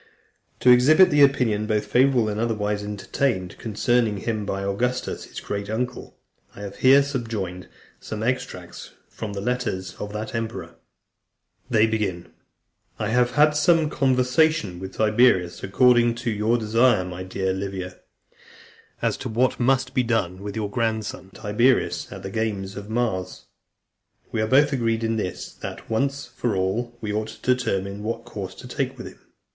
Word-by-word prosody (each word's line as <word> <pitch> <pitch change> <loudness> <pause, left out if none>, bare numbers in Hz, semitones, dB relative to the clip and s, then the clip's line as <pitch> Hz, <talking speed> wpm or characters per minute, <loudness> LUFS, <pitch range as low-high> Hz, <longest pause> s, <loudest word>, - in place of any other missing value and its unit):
To 125 - +7
exhibit 155 +9 +6
the 145 0 +4
opinion, 120 -7 +3
both 105 -1 0
favourable 125 +1 +3
and 105 0 -2
otherwise, 105 -3 -1
entertained 105 -1 -2
concerning 115 0 +1
him 105 0 -3
by 100 0 -2
Augustus, 125 +6 -2
his - - -8
great 100 0 -4
uncle, 125 +3 -4 0.4
I - - -10
have 100 -1 -7
here 135 +2 +6
subjoined 115 -10 -4 0.3
some 110 0 -5
extracts 125 +2 -4 0.2
from 110 -2 -6
the 100 - -4
letters 120 -5 -2
of 105 - -5
that 105 +1 -5
emperor. 115 0 -4 1.0
IV. 110 -6 +1 0.7
"I 105 - -2
have 125 +1 +2
had 150 +1 +6
some 155 +1 +3
conversation 130 - +2
with 95 +1 -8
Tiberius, 110 -5 +3
according 120 +3 +4
(298) 120 - -8
to 120 - 0
your 110 +3 +2
desire, 115 -2 +3
my 90 0 -6
dear 95 0 -2
Livia, 95 -1 -5 1.0
as - - +1
to - - -5
what 120 +3 +1
must 130 +1 +2
be 125 - +3
done 105 -7 -1
with 100 0 -6
your 105 -2 -3
grandson, 110 -4 -2
Tiberius, 115 +6 +1
at 95 - -8
the 95 - -5
games 100 -3 -2
of 100 +1 -8
Mars. 110 -5 -2 0.9
We 110 - -1
are 110 - 0
both 140 +4 +4
agreed 115 -3 0
in 115 0 0
this, 95 -4 -4
that, - - -7
once 140 +5 0
for 120 -8 -3
all, 110 +6 -1
we 105 -2 -3
ought 110 +1 -1
to 110 +3 0
determine 100 -5 -2
what 115 +2 -4
course 100 -5 -7
to - - -10
take - - -3
with - - -8
him. - - -11
110 Hz, 160 wpm, -24 LUFS, 100-125 Hz, 1.0 s, To